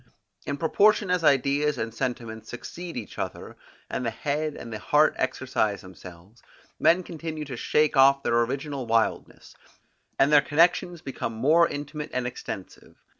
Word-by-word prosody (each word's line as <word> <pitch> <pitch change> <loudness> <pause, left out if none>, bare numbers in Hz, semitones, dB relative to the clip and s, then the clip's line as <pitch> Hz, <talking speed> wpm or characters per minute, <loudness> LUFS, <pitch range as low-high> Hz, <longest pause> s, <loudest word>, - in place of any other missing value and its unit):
In 140 - -2
proportion 200 +5 +3
as 180 -2 +1
ideas 140 +1 +2
and 110 0 -3
sentiments 115 -2 -4
succeed 170 +7 -7
each 115 - -7
other, - - -5 0.3
and - - -3
the 115 - 0
head 150 +5 -2
and 115 -1 -8
the 110 - -5
heart 150 +7 +3
exercise 125 -5 -1
themselves, 95 +2 -14 0.4
men 175 +2 +4
continue 160 -2 -6
to 135 -3 -6
shake 150 +5 +1
off 140 +1 +5
their 120 0 +2
original 135 +1 -3
wildness, 115 0 -1 0.6
and 135 +2 +4
their 145 - +8
connections 170 +2 +2
become 130 -3 -4
more 155 +9 +4
intimate 145 +1 -6
and 125 -1 -1
extensive. 110 -5 -8
140 Hz, 150 wpm, -26 LUFS, 115-155 Hz, 0.6 s, their